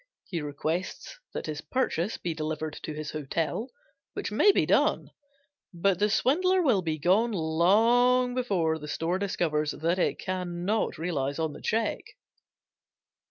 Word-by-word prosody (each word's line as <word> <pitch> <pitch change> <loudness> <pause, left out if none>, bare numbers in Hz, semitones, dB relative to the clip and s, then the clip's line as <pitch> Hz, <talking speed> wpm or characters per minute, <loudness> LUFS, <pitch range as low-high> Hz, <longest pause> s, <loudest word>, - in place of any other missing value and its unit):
He 170 -4 -4
requests 160 - -4
that - - -5
his 155 -1 -4
purchase 220 -7 -1
be 170 - -3
delivered 155 0 -3
to 155 - -5
his 155 -1 -5
hotel, 155 - -2 0.4
which - - -4
may 410 - +5
be - - +2
done, - - +2 0.6
but 180 +1 +1
the 210 +1 +3
swindler 365 - +2
will 240 - +3
be 160 -3 -2
gone 195 +9 +3
long 225 +10 +3
before 185 -11 0
the 150 - -8
store 165 +5 -1
discovers 160 -6 0
that 170 +4 -1
it - - +1
can 180 -2 -4
not 215 +3 0
realize 145 -4 -2
on 160 -2 -1
the - - -11
check. 225 0 0
175 Hz, 150 wpm, -28 LUFS, 155-220 Hz, 0.6 s, may